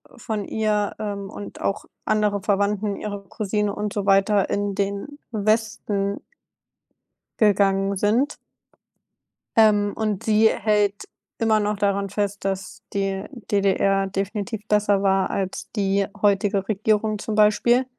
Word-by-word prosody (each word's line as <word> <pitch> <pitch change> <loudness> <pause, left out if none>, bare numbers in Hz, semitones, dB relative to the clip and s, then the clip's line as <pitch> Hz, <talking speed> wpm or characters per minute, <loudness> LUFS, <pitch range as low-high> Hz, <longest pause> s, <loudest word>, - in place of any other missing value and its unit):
von 215 -3 -4
ihr, 210 -1 0
ähm, 200 -2 -4
und 205 0 -9
auch 195 - -2 0.2
andere 210 -2 +1
Verwandten, 205 +1 0
ihre 205 -1 -5
Cousine 210 0 -1
und 210 -1 -3
so 200 -1 -2
weiter 195 0 +3
in 200 -1 -1
den 200 +8 -3
Westen 215 -2 -1 1.2
gegangen 200 -2 +3
sind. 230 +9 +1 1.2
Ähm, 210 -2 +4
und 215 -2 -2
sie 220 0 +4
hält 205 -1 +1 0.3
immer 220 -1 +3
noch 210 0 -1
daran 200 -1 0
fest, 205 0 -2
dass 195 -1 -3
die 195 -1 -1 0.3
DDR 195 -1 +2
definitiv 200 +3 -4
besser 205 -2 +2
war 195 -1 +2
als 190 -1 -3
die 195 -1 +1
heutige 200 -1 +2
Regierung 215 0 +1
zum 215 0 -3
Beispiel 225 +4 +4
205 Hz, 125 wpm, -23 LUFS, 195-215 Hz, 1.2 s, Ähm